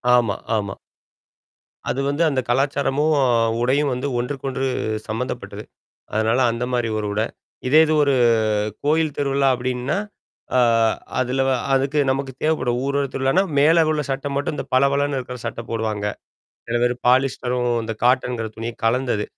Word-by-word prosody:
ஆமா 115 -5 +2 0.2
ஆமா. 100 -2 -3 1.1
அது 135 - -1
வந்து 145 +4 +1
அந்த 135 -3 0
கலாச்சாரமும், 140 +3 +1
அ - - +3 0.3
உடையும் 135 +3 +2
வந்து 125 +3 -3
ஒன்றுக்கொன்று 135 +1 -3 0.4
சம்மந்தப்பட்டது. 115 +4 -4 0.5
அதனால 110 +3 +2
அந்த 115 +1 -3
மாரி 120 -2 0
ஒரு 105 - -3
உடை. 110 +2 +1 0.4
இதே 150 +4 +6
இது 155 - +1
ஒரு 140 -1 +2 0.7
கோயில் 155 -1 +1
திருவிழா 140 -1 +1
அப்டின்னா 125 +6 -2 0.6
ஆ - - +5 0.6
அதுல 130 +1 0
வ - - +2 0.2
அதுக்கு 135 +2 +1
நமக்கு 135 0 -1
தேவைப்படும். 130 -6 +1
ஊர்த்தலனா 140 +4 +1 0.2
மேல 160 +3 +5
உள்ள 150 - 0
சட்ட 135 +1 -2
மட்டும் 145 +1 -1
இந்த - - -4
பளபளன்னு 140 +1 +2
இருக்கிற 125 0 -7
சட்ட 115 0 -4
போடுவாங்க. 110 -2 -2 0.6
சில 120 - 0
பேரு 120 0 +2
பாலிஸ்டரும் 125 -1 +1
இந்த 115 0 -3
காட்டன்ங்கிற 125 -2 +1
துணியும் 115 +1 -6
கலந்தது. 115 -2 +1
130 Hz, 140 wpm, -21 LUFS, 120-140 Hz, 1.1 s, இதே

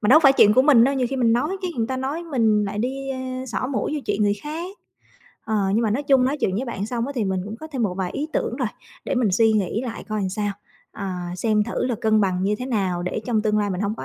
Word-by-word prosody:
mà 210 - 0
đâu 310 +5 +8
phải 275 -4 +7
chuyện 210 -6 +6
của 260 - +6
mình 265 -6 +6
đâu, 275 +2 +2
nhiều 260 -2 +1
khi 270 - -2
mình 235 -3 +3
nói 295 +11 0
cái 365 - -1
người 225 -2 0
ta 260 +2 -3
nói 275 +6 -3
mình 225 -10 +2
lại 205 +1 -4
đi, 270 +4 -3
a, 260 -1 -4
xỏ 240 +1 -2
mũi 270 +2 -2
vô 300 - -2
chuyện 210 - 0
người 205 0 +3
khác. 335 +6 -6 0.7
Ờ, 220 - -2 0.2
nhưng 225 - +2
mà 220 - +1
nói 245 +7 0
chung 270 -3 +4
nói 270 +3 0
chuyện 185 - +1
với 245 - -1
bạn 205 -5 -4
xong 235 +1 -2
á, 280 - -4
thì 230 - +1
mình 190 -1 -1
cũng 210 +2 -6
có 315 - -9
thêm 260 -4 -1
một 195 -5 0
vài 185 -2 -1
ý 300 +2 -3
tưởng - - -1
rồi, - - -1 0.4
để - - -1
mình 245 -4 +2
suy 225 +3 +4
nghĩ 215 +2 0
lại 240 -3 -6
coi 215 -1 -2
làm 190 - -1
sao, 205 +1 -2 0.4
à, 180 -3 -5
xem 210 +2 +1
thử 235 - -2
là 250 - 0
cân 220 -1 +3
bằng 185 -2 +1
như 200 +2 +1
thế 250 - -4
nào 190 -8 -1
để 180 +4 -2
trong 225 -4 +1
tương 215 -1 +1
lai 205 -1 0
mình 185 -1 -3
hông 205 +1 -1
có - - -6
230 Hz, 300 wpm, -23 LUFS, 205-265 Hz, 0.7 s, đâu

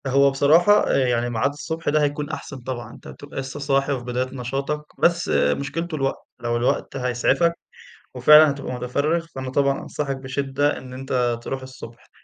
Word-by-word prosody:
هو 140 +1 +4
بصراحة، 160 +9 +4
آآ - - +3
يعني 120 0 0
ميعاد 120 +3 +1
الصبح 160 +2 -4
ده 155 +1 +2
هيكون 145 0 -1
أحسن 145 -2 -6
طبعًا، 120 -2 -6
أنت - - -14
بتبقى 145 -1 -8
لسّه 135 +2 -6
صاحي 140 0 +1
وفي 125 -3 -5
بداية 125 +1 -2
نشاطَك، 135 +4 -3 0.2
بس 170 0 +2
مشكلته 165 +4 0
الوقت، 135 -2 -2 0.2
لو 120 0 -1
الوقت 120 +3 -1
هيسعفَك 125 +7 +1 0.6
وفعلًا 150 0 +7
هتبقى 140 -2 -5
مُتفرِّغ، 145 +7 -1
فأنا 130 -1 -4
طبعًا 140 +1 +1
أنصحَك 140 -2 -4
بشدّة 140 +2 -1
إن 130 -1 -10
أنت 125 -2 -1
تروح 135 +1 -4
الصبح، 130 -3 -12
135 Hz, 165 wpm, -23 LUFS, 125-145 Hz, 0.6 s, وفعلًا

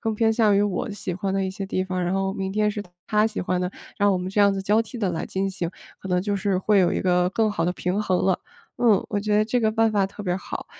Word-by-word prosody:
更 225 -1 -1
偏 225 +1 +2
向 215 -3 +3
于 205 - +4
我 205 0 -1
喜 205 -2 -4
欢 190 +2 -2
的 195 0 +1
一 190 - -2
些 195 +1 -5
地 185 -1 -1
方， 185 -1 -2
然 175 +1 0
后 195 0 0
明 190 -1 -3
天 210 +1 +1
是 210 0 -4 0.2
他 215 0 +3
喜 220 - -5
欢 180 0 -1
的， 180 0 -1 0.3
让 205 -1 +4
我 190 - +2
们 180 +1 -4
这 205 - +1
样 200 0 +6
子 195 - -3
交 210 +3 +3
替 230 +3 -6
地 205 -5 0
来 165 - -3
进 195 +1 -2
行， 180 -3 -3 0.3
可 190 - -8
能 180 -1 +1
就 205 +1 -1
是 195 -1 0
会 205 +2 +3
有 180 -2 +4
一 - - -1
个 180 -1 +3
更 215 +3 +1
好 165 - -1
的 - - +2
平 185 +3 -1
衡 185 -4 +1
了。 190 -1 +2 0.4
嗯， 225 -5 +4
我 205 - -1
觉 210 +1 0
得 210 - +4
这 220 +3 0
个 220 -2 +1
办 225 0 +3
法 200 -2 +2
特 210 - -9
别 180 -2 -1
好。 190 - -6
195 Hz, 320 characters per minute, -24 LUFS, 185-210 Hz, 0.4 s, 样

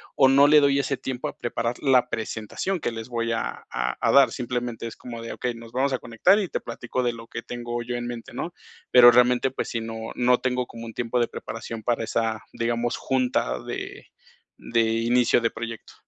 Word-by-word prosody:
o 135 - +6
no 140 +2 +6
le 150 +1 +7
doy 140 -1 +3
ese 140 0 0
tiempo 130 -1 -4
a - - -8
preparar 120 0 -2
la 130 -3 +4
presentación 110 - -3
que - - -2
les 115 +1 -7
voy 115 -1 -1
a 115 - -3
a 60 0 -2
a - - +2
dar. 140 -1 +6
Simplemente 120 -2 -3
es 115 - -8
como 120 -2 -8
de, 115 - -6
okey, 125 -1 -3
nos 115 0 -11
vamos 135 +3 +1
a 130 - 0
conectar 150 - +3
y 200 - -1
te - - -3
platico 120 +2 -4
de 120 -1 +1
lo 115 0 -10
que 120 - -6
tengo 120 0 -5
yo 120 +1 -4
en 120 0 -3
mente, 120 -1 -7
¿no?, 170 - -4 0.4
pero 120 -1 +9
realmente, 125 +2 +4
pues - - -4
sí, 115 - -2
no 115 0 -6
no 125 0 +3
tengo 125 -1 0
como 115 0 -9
un 115 - -8
tiempo 120 +1 -1
de 120 - +2
preparación 115 -1 -7
para 120 -1 0
esa, 110 -1 -1
digamos, 120 +1 -1
junta 125 - 0
de - - -6 0.6
de 115 0 +2
inicio 115 +2 +2
de 115 - +2
proyecto. 115 0 -7
120 Hz, 215 wpm, -25 LUFS, 115-125 Hz, 0.6 s, pero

